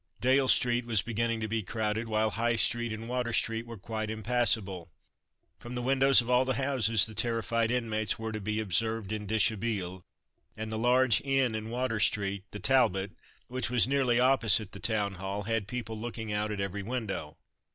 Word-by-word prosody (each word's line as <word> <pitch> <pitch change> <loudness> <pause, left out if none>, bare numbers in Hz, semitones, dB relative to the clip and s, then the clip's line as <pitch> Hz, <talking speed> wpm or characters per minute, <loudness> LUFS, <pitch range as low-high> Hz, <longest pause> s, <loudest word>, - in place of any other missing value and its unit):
Dale 130 +2 +3
street 120 -1 +2
was 110 -4 +2
beginning 115 0 -1
to 110 - -2
be 110 +1 -1
crowded 110 +2 -2
while 110 0 +1
High 115 +2 0
street 120 +1 +2
and 110 +1 -6
Water 125 -1 -2
street 115 0 -1
were 115 -1 -8
quite 110 +2 -4
impassable. 110 -6 0 0.7
From 120 +1 -8
the 125 - -2
windows 135 0 +5
of 115 - -8
all 125 +1 +4
the 130 -1 -1
houses 115 -5 +2
the 110 - -6
terrified 115 +1 0
inmates 110 -4 -1
were 110 -1 -4
to 110 -1 -5
be 110 +2 -2
observed 110 +1 -1
en 105 -1 -4
dishabille, 105 -3 0 0.6
and 110 0 -5
the 110 - -2
large 125 0 +4
inn 135 -3 +1
in 110 0 -4
Water 120 -2 -1
street, 100 -1 0
the - - -7
Talbot, 100 -5 +2 0.4
which 130 -1 -2
was 125 -1 +3
nearly 130 -3 +2
opposite 115 -6 +3
the 100 - -9
Town 105 -3 -1
Hall, 100 +1 -3
had 115 -1 -1
people 115 -1 -5
looking 115 -2 -5
out 105 +1 -1
at 105 - -4
every 100 +1 -3
window. 100 -9 -4
115 Hz, 185 wpm, -29 LUFS, 105-120 Hz, 0.7 s, windows